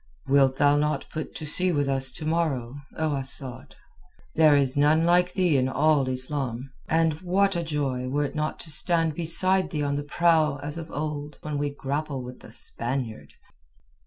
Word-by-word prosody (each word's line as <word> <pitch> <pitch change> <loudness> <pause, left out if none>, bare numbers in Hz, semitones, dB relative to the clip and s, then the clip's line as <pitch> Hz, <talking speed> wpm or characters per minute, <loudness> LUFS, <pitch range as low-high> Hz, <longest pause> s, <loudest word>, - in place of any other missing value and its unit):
"Wilt 135 -1 +3
thou 145 +1 +3
not 150 -1 -1
put 155 -1 -6
to 155 - -6
sea 180 +5 +1
with 145 -4 0
us 135 -1 0
to 155 - -6
morrow, 155 -7 -1 0.2
O 155 -2 0
Asad? 135 -1 -5 0.6
There 155 -2 +5
is 135 -2 +2
none 150 +3 +3
like 180 +1 +3
thee 180 -6 +2
in 130 0 +1
all 145 -1 +2
Islam, 130 -1 -2 0.2
and 160 -1 +1
what 195 +2 +1
a 170 - 0
joy 140 -6 -2
were 145 +2 0
it - - -6
not 155 0 -2
to 160 - -2
stand 165 +1 +2
beside 185 +4 +3
thee 150 -3 -2
on 140 0 -1
the - - -2
prow 155 -1 +2
as 145 +1 -4
of 165 -1 -7
old 150 0 -5
when 150 -2 -3
we 145 0 -1
grapple 140 -1 -4
with 125 0 -10
the - - -14
Spaniard." 120 -2 -1
145 Hz, 185 wpm, -25 LUFS, 135-160 Hz, 0.6 s, There